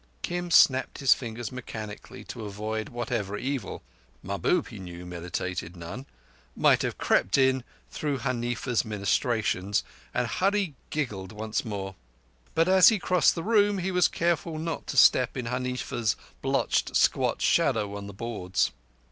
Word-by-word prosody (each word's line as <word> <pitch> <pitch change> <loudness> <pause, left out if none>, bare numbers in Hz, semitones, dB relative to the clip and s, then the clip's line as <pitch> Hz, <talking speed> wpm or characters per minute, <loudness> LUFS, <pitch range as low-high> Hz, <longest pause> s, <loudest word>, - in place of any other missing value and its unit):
Kim 175 0 -3
snapped 130 -5 +5
his 135 -2 +5
fingers 115 -2 -6
mechanically 110 -4 -8
to 115 - -8
avert 110 +1 -4
whatever 105 -4 -3
evil—Mahbub, 100 - -3
he 110 - -9
knew, 90 -1 -8
meditated 90 0 -4
none—might 85 - -2
have - - -2
crept 95 - +2
in 130 -1 +3 0.3
through 145 -2 -2
Huneefa's 120 -2 -1
ministrations; 105 -1 0 0.3
and - - 0
Hurree 195 -3 0 0.2
giggled 105 -12 -3
once 110 0 -3
more. 100 -3 -5 0.6
But 165 +1 +3
as 190 0 +8
he 220 - +2
crossed 180 -4 +3
the 165 - -4
room 205 -1 +3
he 190 +1 -2
was 180 -1 +4
careful 170 -1 -1
not 165 +1 -4
to - - -4
step 125 +1 +5
in 125 - -3
Huneefa's 125 -3 -1 0.3
blotched, - - 0
squat - - +2
shadow 100 -1 +2
on 100 0 -6
the 100 - -8
boards. 95 - -1
115 Hz, 140 wpm, -27 LUFS, 100-145 Hz, 0.6 s, as